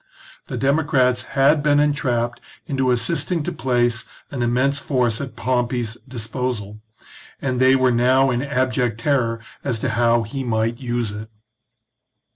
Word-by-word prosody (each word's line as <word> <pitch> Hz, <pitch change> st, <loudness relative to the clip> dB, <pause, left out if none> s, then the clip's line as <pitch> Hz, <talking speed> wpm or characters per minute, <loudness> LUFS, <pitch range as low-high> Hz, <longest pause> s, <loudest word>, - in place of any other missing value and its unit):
The -, -, -4 dB
democrats 135 Hz, -3 st, +2 dB, 0.2 s
had 140 Hz, +3 st, +5 dB
been 145 Hz, 0 st, +3 dB
entrapped 125 Hz, -5 st, 0 dB, 0.2 s
into 135 Hz, -3 st, 0 dB
assisting 165 Hz, +6 st, 0 dB
to -, -, -3 dB
place 120 Hz, -1 st, 0 dB, 0.3 s
an 135 Hz, -4 st, -3 dB
immense 130 Hz, +4 st, +1 dB
force 125 Hz, -5 st, 0 dB
at 135 Hz, -2 st, -7 dB
Pompey's 120 Hz, -2 st, -1 dB
disposal, 115 Hz, -3 st, -4 dB, 0.6 s
and 130 Hz, -2 st, -1 dB
they 130 Hz, +1 st, +6 dB
were 130 Hz, -1 st, +3 dB
now 130 Hz, +3 st, +3 dB
in 120 Hz, 0 st, 0 dB
abject 125 Hz, -4 st, 0 dB
terror 115 Hz, -3 st, +1 dB, 0.2 s
as 125 Hz, -5 st, -1 dB
to 125 Hz, +4 st, -2 dB
how 120 Hz, 0 st, +2 dB
he 135 Hz, +5 st, -5 dB
might 115 Hz, 0 st, -1 dB
use 120 Hz, -4 st, -2 dB
it. 105 Hz, +1 st, -8 dB
125 Hz, 140 wpm, -21 LUFS, 120-135 Hz, 0.6 s, they